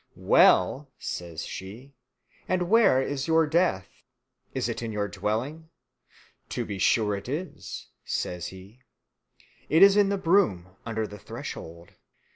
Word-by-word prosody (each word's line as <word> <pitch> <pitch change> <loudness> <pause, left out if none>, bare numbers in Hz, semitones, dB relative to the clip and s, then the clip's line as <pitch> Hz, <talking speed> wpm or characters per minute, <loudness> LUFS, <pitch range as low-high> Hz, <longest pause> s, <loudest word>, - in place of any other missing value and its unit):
"Well," 130 +10 +4
says 85 -2 -5
she, 115 +9 -9 0.5
"and 180 0 -1
where 220 - +5
is 140 +1 -3
your 160 0 +4
death? 155 - +1 0.6
is 130 -3 -2
it 115 - -4
in 115 -1 -4
your 105 -1 -1
dwelling?" 115 - -3 0.8
"To - - -3
be 100 -2 -5
sure 105 +1 +2
it 100 +5 -7
is," 165 +7 -6
says 90 -2 -3
he, 95 +6 -13 0.9
"it 160 +5 +6
is 200 0 +8
in 205 -1 +4
the 200 - 0
broom 165 - +1
under 110 -1 -2
the 105 0 -10
threshold." 85 -2 -8
120 Hz, 135 wpm, -27 LUFS, 100-165 Hz, 0.9 s, is